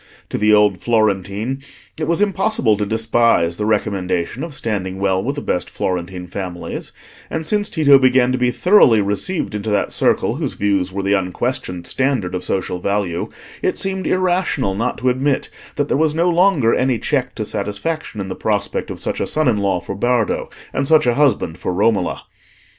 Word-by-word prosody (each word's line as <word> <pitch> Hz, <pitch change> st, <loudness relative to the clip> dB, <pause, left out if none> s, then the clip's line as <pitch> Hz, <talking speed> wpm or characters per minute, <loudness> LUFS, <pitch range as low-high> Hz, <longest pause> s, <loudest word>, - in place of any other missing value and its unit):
To -, -, -2 dB
the 105 Hz, +1 st, +3 dB
old 105 Hz, -3 st, +4 dB
Florentine 110 Hz, +2 st, 0 dB, 0.3 s
it 155 Hz, -1 st, -3 dB
was 170 Hz, +4 st, +2 dB
impossible 195 Hz, -, +1 dB
to 105 Hz, 0 st, -2 dB
despise 110 Hz, -6 st, +2 dB
the 105 Hz, -, -2 dB
recommendation 100 Hz, -1 st, -1 dB
of 165 Hz, -4 st, -6 dB
standing 100 Hz, -7 st, -3 dB
well 95 Hz, -1 st, 0 dB
with 140 Hz, +4 st, -2 dB
the 145 Hz, -, -5 dB
best 90 Hz, -, -1 dB
Florentine 90 Hz, 0 st, -3 dB
families, 90 Hz, -1 st, -6 dB, 0.4 s
and 160 Hz, 0 st, -3 dB
since 210 Hz, +3 st, +1 dB
Tito 145 Hz, -5 st, +5 dB
began 130 Hz, -1 st, +4 dB
to 130 Hz, -, 0 dB
be 125 Hz, 0 st, +2 dB
thoroughly 135 Hz, -, +5 dB
received 105 Hz, -, -1 dB
into 105 Hz, +1 st, -3 dB
that 105 Hz, -1 st, 0 dB
circle -, -, +1 dB
whose -, -, -3 dB
views 100 Hz, -3 st, 0 dB
were 100 Hz, +1 st, -3 dB
the 100 Hz, +1 st, +1 dB
unquestioned 90 Hz, -1 st, -2 dB
standard 130 Hz, -9 st, 0 dB
of 90 Hz, 0 st, -3 dB
social 90 Hz, -1 st, -2 dB
value, 100 Hz, -3 st, -2 dB, 0.3 s
it -, -, 0 dB
seemed 190 Hz, -1 st, -1 dB
irrational 180 Hz, -, +1 dB
not 115 Hz, +6 st, -2 dB
to 130 Hz, -, +1 dB
admit 130 Hz, +2 st, 0 dB, 0.3 s
that 145 Hz, -1 st, 0 dB
there -, -, 0 dB
was 155 Hz, 0 st, +1 dB
no 170 Hz, +2 st, +2 dB
longer 170 Hz, -9 st, +3 dB
any 130 Hz, -2 st, +1 dB
check 125 Hz, 0 st, -1 dB
to 110 Hz, -, -3 dB
satisfaction 105 Hz, +7 st, -4 dB
in 95 Hz, -, -3 dB
the 95 Hz, -, -4 dB
prospect 105 Hz, +1 st, -2 dB
of -, -, -6 dB
such -, -, -1 dB
a -, -, -1 dB
son 155 Hz, -1 st, +1 dB
in 110 Hz, -4 st, +2 dB
law 100 Hz, -2 st, +1 dB
for 100 Hz, -, -6 dB
Bardo, 120 Hz, +2 st, 0 dB, 0.2 s
and 135 Hz, -, -1 dB
such 155 Hz, -1 st, +5 dB
a 120 Hz, -, +3 dB
husband 120 Hz, -, +1 dB
for -, -, -2 dB
Romola. 100 Hz, 0 st, 0 dB
110 Hz, 185 wpm, -19 LUFS, 100-140 Hz, 0.4 s, Tito